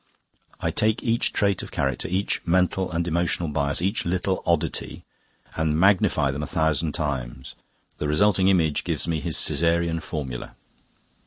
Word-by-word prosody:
I - - -1
take 110 +2 0
each 115 -1 +1
trait 100 -3 +1
of - - -8
character, 70 -2 -2
each 95 +3 -1
mental 90 +1 +1
and 85 0 -1
emotional 85 0 0
bias, 70 +2 -1
each 100 +4 0
little 95 +2 -1
oddity, - - -1 0.5
and 80 -1 0
magnify 95 -7 +3
them 70 +2 -4
a 75 - -4
thousand 80 -1 0
times. 65 -5 -4 0.5
The 75 - -1
resulting 95 +4 +3
image 85 -6 +2
gives - - -1
me 80 -2 0
his 85 0 0
Caesarean 85 +2 +1
formula." 70 -6 -6
85 Hz, 150 wpm, -24 LUFS, 75-95 Hz, 0.5 s, magnify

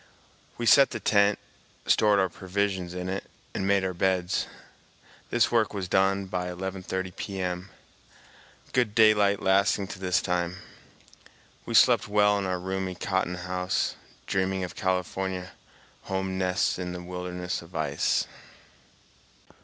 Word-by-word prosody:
We 120 - -3
set 135 +4 +7
the 110 - -5
tent, 100 -1 +3 0.5
stored 105 -1 +4
our 95 -1 +3
provisions 95 0 -2
in 90 0 -4
it, 95 +1 -3 0.3
and 95 - -2
made 100 -1 +3
our 95 - -2
beds. 90 0 0 0.8
This 120 - +2
work 110 -3 +2
was 95 -2 -3
done 95 +1 +2
by 90 -1 -3
11.30 95 0 -4
P.M., 90 -1 -4 1.0
good 120 -4 +1
daylight 105 -3 +5
lasting 100 +1 +3
to 95 - -7
this 90 -1 +1
time. 90 0 -1 1.1
We 115 - -2
slept 120 -2 +5
well 105 0 +3
in 100 - -2
our 90 -1 -1
roomy 95 0 -3
cotton 95 -1 -1
house, 90 0 -1 0.3
dreaming 95 0 0
of 90 - -5
California 95 0 -2 0.5
home 95 0 -2
nests 95 0 0
in 90 -1 -4
the 90 0 -7
wilderness 90 0 -4
of 85 +1 -15
ice. 75 -3 +1
95 Hz, 135 wpm, -27 LUFS, 90-100 Hz, 1.1 s, set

